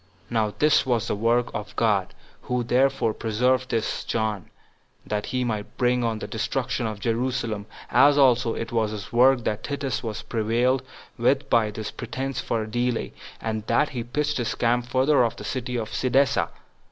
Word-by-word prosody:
Now 110 -3 0
this 150 0 +4
was 120 -3 0
the - - 0
work 120 +3 +1
of 105 0 -6
God, 105 -5 +1 0.3
who 125 -1 -1
therefore 125 -2 +2
preserved 125 +4 +1
this 115 -2 -1
John, 110 -5 -2 0.6
that 105 -1 -2
he 125 -1 -1
might 110 -4 -4
bring 125 0 +2
on 115 -1 0
the - - -5
destruction 120 +1 -2
of 110 -2 -5
Jerusalem; 115 -2 -1 0.2
as 145 0 +6
also 125 -4 +4
it 115 0 -4
was 110 -2 +1
his 105 -1 -7
work 125 +1 +5
that 110 -1 -2
Titus 140 -3 -2
was 110 -3 -5
prevailed 120 +3 +1 0.4
with 135 +4 +1
by 115 -2 +4
this 105 0 -5
pretense 130 +2 -4
for 115 -2 -1
a - - -7
delay, 120 +1 -1 0.3
and 110 -1 -3
that 120 +6 +2
he 125 -4 -4
pitched 150 +5 -1
his 120 -3 -1
camp 120 +1 +1
further 130 +2 +3
off 115 - 0
the - - -9
city 125 +2 -3
at 110 -2 -3
Cydessa. 135 +3 +2
120 Hz, 175 wpm, -25 LUFS, 110-130 Hz, 0.6 s, as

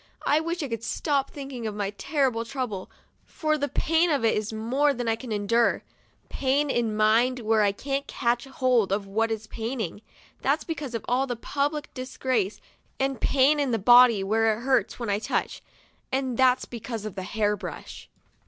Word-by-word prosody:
I 300 - +4
wish 335 +1 -3
I - - -2
could 230 -2 -5
stop 275 +3 0
thinking 270 -5 -6
of 210 - -5
my 205 -1 -2
terrible 260 0 0
trouble, 230 -6 -4 0.3
for 310 -1 -1
the 285 -1 -1
pain 325 +4 +2
of 280 -7 +1
it 225 - +3
is 210 0 -2
more 260 +7 +1
than 245 -1 -3
I 225 - +2
can 235 0 -9
endure; 215 +3 +1 0.4
pain 280 +2 0
in 225 -4 0
my 215 +3 +5
mind 255 0 -4
where 220 -1 +2
I 205 -1 +3
can*t 275 +7 -3
catch 240 +1 0
hold 255 -6 +1
of 200 0 0
what's 220 +2 -1
paining; 225 -3 -4 0.4
that's 285 +3 +1
because 290 -7 -5
of 230 - -4
the 250 0 0
public 290 +3 -2
disgrace, 255 -5 -2 0.4
and 270 -1 -1
pain 280 +2 +3
in 280 -2 +1
the 230 - +1
body, 240 -1 +6
where 220 +2 +2
it 235 - -9
hurts 265 0 +1
when 230 -4 -2
I 200 - +1
touch, - - -2 0.5
and 260 -2 -1
that's 255 0 +3
because 230 -2 -6
of 215 - -5
the 190 - -5
hair 210 +2 0
brush. 180 -6 -9
240 Hz, 185 wpm, -26 LUFS, 220-275 Hz, 0.5 s, body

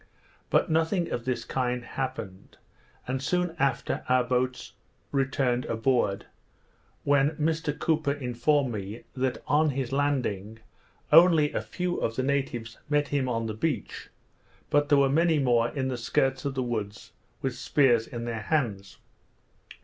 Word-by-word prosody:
But - - +2
nothing 165 +2 +1
of 120 - -3
this 130 -1 -2
kind 125 -1 -2
happened; 115 -9 -6 0.5
and 130 +1 -2
soon 180 +3 0
after 135 -1 0
our 125 0 +4
boats 125 0 -1 0.4
returned 135 -3 0
aboard, 115 -4 0 0.8
when 145 +1 +3
Mr 155 -1 -1
Cooper 155 -2 +1
informed 130 0 0
me, 105 +2 -6
that, 130 -1 -2
on 150 +3 +3
his 135 -2 -3
landing, 125 -7 -1 0.5
only 160 -2 +6
a - - -1
few 180 -1 -3
of 115 - -2
the 130 - -1
natives 130 -5 -2
met 145 -1 +1
him 135 -3 0
on 115 -1 -1
the 110 - -3
beach, 140 +6 -3 0.6
but 145 0 +3
there 145 - +5
were 140 -1 +5
many 160 +4 +3
in 130 -1 +1
the 125 - -2
skirts 135 +3 0
of 140 -1 -2
the 130 - 0
woods 110 -4 -4 0.3
with 135 -2 0
spears 120 -6 +2
in 120 -1 -6
their 115 -2 -3
hands. 105 - -2
130 Hz, 145 wpm, -27 LUFS, 120-145 Hz, 0.8 s, only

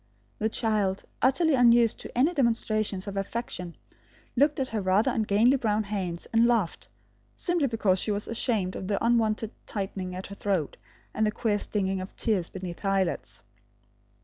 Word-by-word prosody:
The 220 - +1
child, 210 -4 0 0.2
utterly 295 +5 +3
unused 235 -3 +5
to - - -9
any 290 +8 +3
demonstrations 215 - 0
of 200 -1 -6
affection, 195 -4 -4 0.6
looked 285 +3 +3
at 265 - -1
her 220 -2 -2
rather 190 +3 +2
ungainly 220 +5 +3
brown 215 -3 0
hands 190 -5 -4
and 230 +1 +5
laughed, 225 -8 0 0.5
simply 345 -5 +1
because 215 -6 +1
she - - -2
was 205 0 -1
ashamed 220 -5 0
of 190 - -5
the 205 +2 0
unwonted 225 -2 +1 0.2
tightening 190 -3 -4
at 185 - -6
her 200 - -8
throat 195 -7 -1 0.4
and 220 - 0
the 210 - +2
queer 210 -2 0
stinging 190 -3 -1
of 185 - -9
tears 195 -7 0
beneath 180 -2 -7
her 195 - -1
eyelids. 190 - -1
210 Hz, 165 wpm, -27 LUFS, 190-235 Hz, 0.6 s, unused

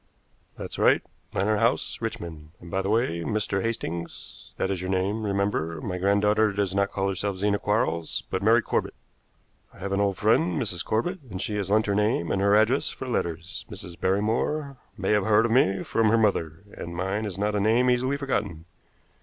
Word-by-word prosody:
"That's - - -6
right; - - +4 0.3
Lantern 105 +2 +1
House, - - 0
Richmond. 80 -2 -6
And, 85 -1 -12
by 95 - 0
the 95 - -2
way, 110 -5 +1
Mr. 100 +1 -1
Hastings 85 -7 -5
that 95 - 0
is 95 -2 -2
your 95 - -4
name, 95 +4 0
remember 100 -5 -1
my 90 +2 -4
granddaughter 105 +3 +3
does 100 -1 -1
not 100 0 +1
call 95 0 -1
herself 95 0 -2
Zena 100 +1 +1
Quarles, 85 -5 0
but 95 - -1
Mary 110 +3 +4
Corbett. - - -1 0.8
I - - -18
have 100 +1 -5
an 100 +1 +1
old 100 -2 +1
friend, 95 -5 +2
Mrs. 85 -2 -2
Corbett, 175 - -1
and 95 -2 -6
she 105 - -2
has 100 -2 -2
lent 110 +2 +3
her 100 - 0
name 105 -4 +1
and 95 - 0
her 100 +1 +4
address 110 +6 +3
for 130 - -7
letters. 85 -7 -3
Mrs. 85 - -8
Barrymore 115 +9 0 0.2
may 95 +1 -1
have 105 -2 +3
heard 110 +1 +4
of 115 - 0
me 100 -6 +3
from 115 -1 +2
her 115 - +4
mother, 95 -6 0
and 85 0 -7
mine 95 +5 -1
is 100 -3 -5
not 105 +1 0
a 105 - +1
name 115 +5 +3
easily 130 +3 +1
forgotten. 85 - -2
100 Hz, 195 wpm, -26 LUFS, 95-110 Hz, 0.8 s, right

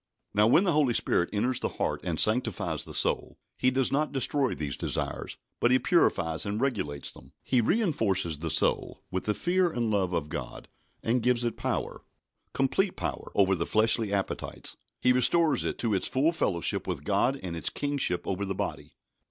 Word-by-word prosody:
Now, 105 +1 +4
when 160 +10 +5
the 185 - +2
Holy 145 -6 +2
Spirit 85 - +1
enters 115 +5 +1
the - - -1
heart - - -1
and 85 -4 -2
sanctifies 115 -1 +1
the - - -9
soul, - - 0 0.2
He 130 - +2
does 130 0 +1
not 145 0 0
destroy 135 -1 +1
these 70 -4 -3
desires, - - -3 0.2
but 120 - +3
He 130 - +5
purifies 80 - +2
and 105 +1 -3
regulates 95 - -2
them. - - -16
He 125 -2 +2
reinforces 110 - +1
the 80 +1 -3
soul - - +1
with 95 0 -3
the 105 - 0
fear 180 0 +1
and 120 -7 -1
love 95 -3 +1
of 80 -4 -2
God, - - -6 0.4
and 120 +2 +1
gives 120 0 +2
it 120 - -1
power, - - -3 0.5
complete 175 +8 0
power, - - -4
over 95 -1 +4
the 85 -3 -2
fleshly 110 -1 +2
appetites. 100 -1 -2 0.2
He 125 - +4
restores 160 +5 +3
it - - -2
to 115 -3 0
its 95 - 0
full 145 +5 +2
fellowship 90 - -1
with - - -3
God 135 +2 +1
and 85 -2 -4
its 85 - -1
kingship 140 -11 -1
over 100 +1 -2
the 95 -1 -3
body. - - -5
115 Hz, 185 wpm, -28 LUFS, 95-135 Hz, 0.5 s, when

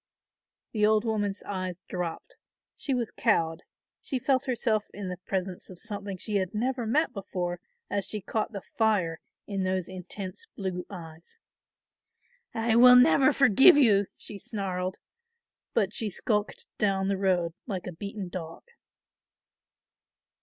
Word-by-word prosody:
The 215 -2 -1
old 215 +1 +4
woman's 205 -3 -1
eyes 185 -2 -4
dropped; 180 - -5 0.4
she 280 - -4
was 235 -3 -2
cowed; 165 -7 +1 0.4
she 265 - -2
felt 265 +1 +1
herself 225 -4 0
in 200 -2 -5
the 180 -1 -5
presence 185 -1 -3
of 185 - -10
something 200 -1 -3
she 205 +3 -1
had 190 +1 -2
never 245 +1 -1
met 305 +8 +2
before, 180 -3 -3 0.3
as 200 -2 -1
she 210 - -2
caught 215 +3 -2
the 200 -3 -6
fire 190 -8 +1 0.3
in 200 -2 -3
those 185 -1 -1
intense 185 0 -7
blue 185 -2 -4
eyes. 165 - -10 1.1
"I 225 0 +1
will 250 +1 +9
never 265 +2 +6
forgive 275 - +7
you," 205 -8 +5
she 200 - -8
snarled, 185 -3 -3 0.8
but 200 0 +2
she 220 -1 -1
skulked 210 +2 -1
down 195 -2 +2
the 200 - +1
road 180 -4 +1
like 190 -6 -4
a 180 - -4
beaten 200 +3 -6
dog. 165 -2 -7
200 Hz, 140 wpm, -28 LUFS, 185-220 Hz, 1.1 s, will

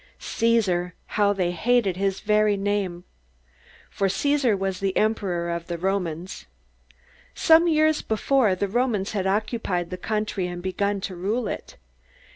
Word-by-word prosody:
Caesar! 195 -7 0 0.2
How 205 -1 +3
they 185 -3 0
hated 215 0 +1
his 195 0 -1
very 210 -1 +2
name! 195 -3 -2 0.9
For 195 -1 0
Caesar 270 0 +1
was 190 -1 -2
the 195 -1 -1
emperor 190 -6 0
of 170 0 -4
the 170 - -3
Romans. 180 -1 -3 0.9
Some 325 +1 +5
years 310 -1 +3
before, 220 -1 +2
the 200 +2 -1
Romans 215 -2 0
had 195 -3 -1
occupied 200 -4 -1
the 180 - -4
country 210 -2 -2
and 175 0 -6
begun 200 +2 -1
to 190 - -5
rule 210 +7 -1
it. - - -6
200 Hz, 140 wpm, -24 LUFS, 185-220 Hz, 0.9 s, Some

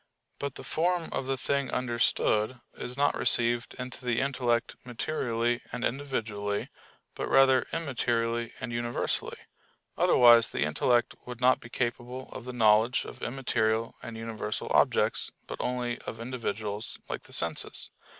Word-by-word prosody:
But 140 -2 -3
the - - -8
form 175 +1 0
of 130 - -2
the 135 0 0
thing 140 +2 -1
understood 120 -1 +1
is 125 +1 -7
not 145 +1 +3
received 120 +1 +2
into 125 -1 -7
the 120 -1 +1
intellect 125 -4 0
materially 120 -2 -1
and 120 - -2
individually, 110 -7 -2 0.4
but - - -4
rather 130 -1 +5
immaterially 120 -6 -1
and 125 -2 -5
universally: 120 0 -1 0.6
otherwise 120 -1 +6
the - - -1
intellect 120 +11 +2
would 125 -1 -7
not 130 +1 +4
be 115 - -12
capable 125 +1 -3
of 125 - -8
the 125 - -5
knowledge 115 0 +4
of - - -10
immaterial 115 -3 0
and 115 -1 -7
universal 110 -2 -4
objects, - - +3 0.2
but - - -6
only 125 -1 -2
of 110 - -7
individuals, 110 -3 -4
like - - -4
the - - -16
senses. - - -1
120 Hz, 140 wpm, -29 LUFS, 115-130 Hz, 0.6 s, otherwise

